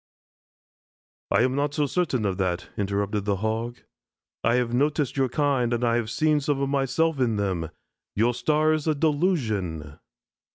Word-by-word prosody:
"I - - +3
am 130 0 +1
not 145 +1 -1
so 150 - +2
certain 140 -7 0
of 95 -2 -1
that," 90 -1 -1
interrupted 100 0 -1
the 100 -1 +1
Hog. 110 +4 -3 0.6
"I 115 +1 +3
have 120 -1 0
noticed 145 +1 +1
your 135 -2 +1
kind 135 -3 +1
and 120 +1 -1
I 120 0 +2
ever 115 - -3
see 155 +6 +2
some 145 -1 -1
of 140 0 0
myself 140 +3 +1
in 120 -4 +2
them. 95 -6 -1 0.5
Your 115 +4 +2
star 155 +4 +2
is 155 0 -2
a 155 - +2
delusion." 110 - -1
125 Hz, 165 wpm, -25 LUFS, 105-145 Hz, 0.6 s, I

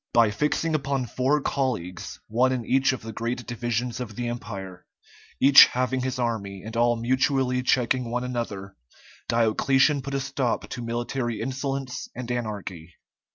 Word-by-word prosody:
By 115 -3 +5
fixing 150 +8 0
upon 140 -3 0
four 130 +6 +1
colleagues, 110 - -3
one 125 +4 +2
in 125 -3 -2
each 135 +3 +3
of 130 -3 -5
the 110 0 -7
great 120 +2 -3
divisions 120 0 -2
of 115 -4 -6
the 120 +1 -2
Empire, 100 -6 -7 0.5
each 140 +1 +9
having 130 +1 -1
his 130 0 -2
army, 105 -6 -3
and 110 +1 -7
all 120 +1 +3
mutually 130 +2 +1
checking 125 -1 +1
one 125 +1 -1
another, 105 -6 -4 0.5
Diocletian 130 +5 +3
put 140 +1 -5
a - - +1
stop 130 -2 -2
to 125 - -5
military 120 0 -2
insolence 135 +1 -3
and 125 -1 -5
anarchy. 95 -8 -5
120 Hz, 155 wpm, -25 LUFS, 115-130 Hz, 0.5 s, each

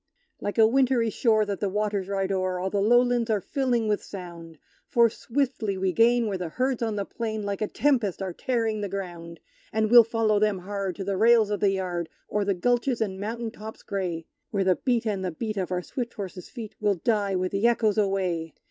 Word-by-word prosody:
Like 205 - -4
a 225 - +7
wintry 245 -1 +2
shore 220 -2 +2
that 200 -2 -3
the 200 - 0
waters 205 -1 -1
ride 195 -1 -1
o'er, 185 -1 -1
All 190 +1 -2
the 200 - +1
lowlands 240 +2 +3
are 215 -2 +2
filling 245 0 0
with 210 -1 +1
sound; 170 -4 -9 0.3
For 235 -2 +4
swiftly 235 -6 -2
we 190 0 0
gain 235 +2 +4
where 200 -3 -2
the 175 -2 -3
herds 255 +6 -1
on 225 -2 -1
the 200 -1 -2
plain, 220 -1 -4
Like 200 0 -3
a 215 - +1
tempest, 240 -10 +1
are 190 -2 -4
tearing 225 -2 -1
the 200 - -3
ground! 175 -4 -6 0.3
And 220 0 0
we'll 240 -1 +10
follow 225 -2 +1
them 210 -2 +2
hard 195 0 -4
to 195 - -5
the 195 0 -2
rails 225 0 +5
of 205 - -1
the 200 - +3
yard, 180 -3 -2 0.2
O'er 210 0 +1
the 200 -1 0
gulches 245 +5 +1
and 190 -4 -2
mountain 225 +2 -4
tops 220 -1 -10
grey, 175 -5 -3 0.2
Where 200 -2 0
the 185 -2 +3
beat 240 -3 0
and 200 -3 -1
the 185 - -1
beat 215 +6 -4
of 185 -1 -2
our 180 0 -1
swift 245 +3 -5
horses' 190 -4 -7
feet 225 -4 -8
Will 205 -1 +2
die 200 +1 0
with 185 0 -1
the 200 +4 +2
echoes 225 -3 +2
away! 185 -5 -1
205 Hz, 220 wpm, -26 LUFS, 190-230 Hz, 0.3 s, we'll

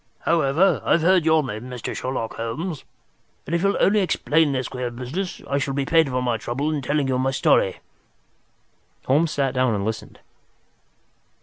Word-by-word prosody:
However, 165 +3 +2
I've 165 - +2
heard 180 -1 +4
your 160 -1 +4
name, 125 -1 -6
Mr. 125 -2 -5
Sherlock 125 -3 -3
Holmes, 135 +8 -4 0.6
and 160 - -5
if 170 - +1
you'll 200 +1 +1
only 210 +2 +4
explain 160 -4 +2
this 130 -2 -2
queer 125 -2 -4
business, 130 +11 -5
I 140 - 0
shall 135 -1 -2
be 140 -1 -1
paid 160 0 +3
for 125 -1 -1
my 120 -2 0
trouble 130 +7 -2
in 145 - -2
telling 145 +1 0
you 130 -1 0
the 135 +1 +1
story." 135 - +2 1.2
Holmes 150 +5 +2
sat 135 -3 -1
down 130 -4 +1
and 100 -1 -2
listened. 110 0 -5
135 Hz, 175 wpm, -23 LUFS, 125-160 Hz, 1.2 s, heard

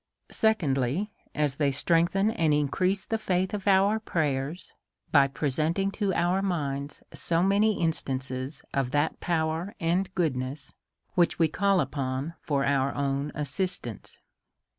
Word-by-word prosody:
Secondly/, 170 - +1 0.2
As 145 -2 0
they 145 -2 +2
strengthen 170 +8 +2
and 160 -7 +2
increase 185 +7 0
the 225 - -1
faith 185 -2 0
of 205 -1 -4
our 200 +2 +4
prayers, 155 -4 -2 0.4
by 140 -2 +6
presenting 155 +8 0
to 200 -1 -1
our 175 +3 +2
mind 145 -6 -2
so 170 +1 +1
many 205 +2 +3
in 165 -1 +3
stances 130 -1 -4
of 135 -2 0
that 145 +4 0
power 165 +2 -1
and 180 +2 0
goodness,, 135 -4 -2 0.4
which 175 -2 +2
we 165 - +4
call 195 +2 +2
upon 135 +1 -2
for 140 -4 0
our 140 -1 +1
own 140 +1 -1
assistance. 150 - -3
160 Hz, 135 wpm, -27 LUFS, 140-190 Hz, 0.4 s, by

